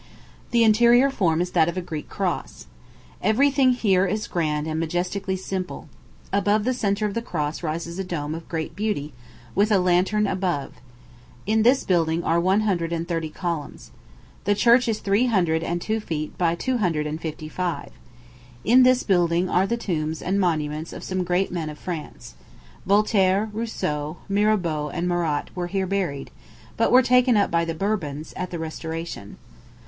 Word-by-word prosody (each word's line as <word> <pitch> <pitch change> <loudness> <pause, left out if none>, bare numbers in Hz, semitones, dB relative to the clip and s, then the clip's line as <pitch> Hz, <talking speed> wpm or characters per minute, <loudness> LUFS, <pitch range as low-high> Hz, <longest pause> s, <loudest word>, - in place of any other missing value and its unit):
The 235 -1 +3
interior 240 +4 +5
form 170 -9 +1
is 180 0 -2
that 165 -2 +3
of 170 - -5
a - - +2
Greek 160 -4 -6
cross. - - -3 0.6
Every 250 +8 +3
thing 265 -2 +4
here 195 -6 +2
is 215 +3 -2
grand 150 -3 -1
and 160 0 -2
majestically 180 +4 -2
simple. 185 0 -5 0.4
Above 205 +1 +2
the 255 +3 +1
centre 210 -3 0
of 205 - -2
the 230 - -2
cross 155 -9 -3
rises 170 +2 -4
a - - -1
dome 155 -5 -4
of 165 +1 -8
great 160 -2 -4
beauty, 195 -9 -2 0.4
with 205 +2 +2
a 205 - +5
lantern 185 +4 +2
above. 180 -7 -1 0.7
In 220 +2 +2
this 250 +4 +4
building 170 -2 +1
are 165 +1 +2
one 190 +4 +3
hundred 175 -6 0
and 170 0 -2
thirty 165 -2 -2
columns. 170 -2 -5 0.5
The 205 +1 +3
church 235 +4 +4
is 225 -2 0
three 205 +5 +2
hundred 175 -8 +2
and 170 +1 -2
two 220 +5 -1
feet 155 -7 -4
by 170 -2 +1
two 255 +7 -1
hundred 165 -7 0
and 155 +2 -4
fifty 155 -1 -5
five. 175 +2 -3 0.7
In 250 +4 +6
this 255 0 +5
building 175 -2 +2
are 185 +2 +2
the 235 - -1
tombs 160 -7 -2
and 195 +2 -1
monuments 155 -3 -1
of - - -8
some 185 0 -3
of 180 - -1
the - - -14
great 180 +2 +1
men 165 -3 -3
of 150 - -8
France. 150 - -7 0.5
Voltaire, 200 0 +3
Rousseau, 155 -9 -3
Mirabeau, 195 -7 +1
and 175 +4 -2
Marat 170 -4 -1
were 175 -1 -2
here 190 +1 -1
buried, 185 -8 -2 0.4
but - - +2
were 255 +1 +7
taken 250 -1 +4
up 200 - +2
by 170 0 +2
the 165 -1 -3
Bourbons, 155 -6 -3
at 185 -1 -4
the 175 - -5
restoration. 160 -7 -6
180 Hz, 180 wpm, -24 LUFS, 160-210 Hz, 0.7 s, were